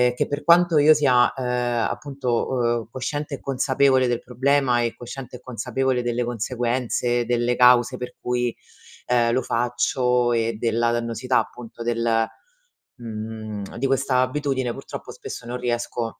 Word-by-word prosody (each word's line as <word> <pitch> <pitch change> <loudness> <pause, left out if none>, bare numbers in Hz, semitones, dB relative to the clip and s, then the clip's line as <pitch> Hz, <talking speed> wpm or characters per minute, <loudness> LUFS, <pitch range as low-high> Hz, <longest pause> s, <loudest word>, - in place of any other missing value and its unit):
che - - 0
per 145 +1 -4
quanto 170 -1 +5
io 150 +2 +7
sia, 125 -5 +3
ehm, 125 -2 -1
appunto 140 -3 -5
o 120 -1 0
cosciente 145 +3 -4
e - - -12
consapevole 135 -1 +2
del 120 -1 0
problema 125 0 +1
e 115 -1 -1
cosciente 125 +1 -8
e - - -22
consapevole 125 +1 -1
delle 120 0 -1
conseguenze, 120 +1 -1
delle 120 0 +1
cause 125 0 +5
per 125 0 -7
cui, 125 -1 -1 0.5
ehm, 120 -1 +2
lo 130 - +2
faccio 125 0 +1
e 115 -1 0
della 115 0 +1
dannosità 120 +2 0
appunto 115 -1 -7
del, 115 -1 +1 0.7
mhmm 110 -3 -6
di 130 - -1
questa 135 -1 +2
abitudine 130 -1 -1
purtroppo - - -8
spesso - - -8
non 125 +1 -3
riesco 120 -1 -2
125 Hz, 145 wpm, -23 LUFS, 120-130 Hz, 0.7 s, io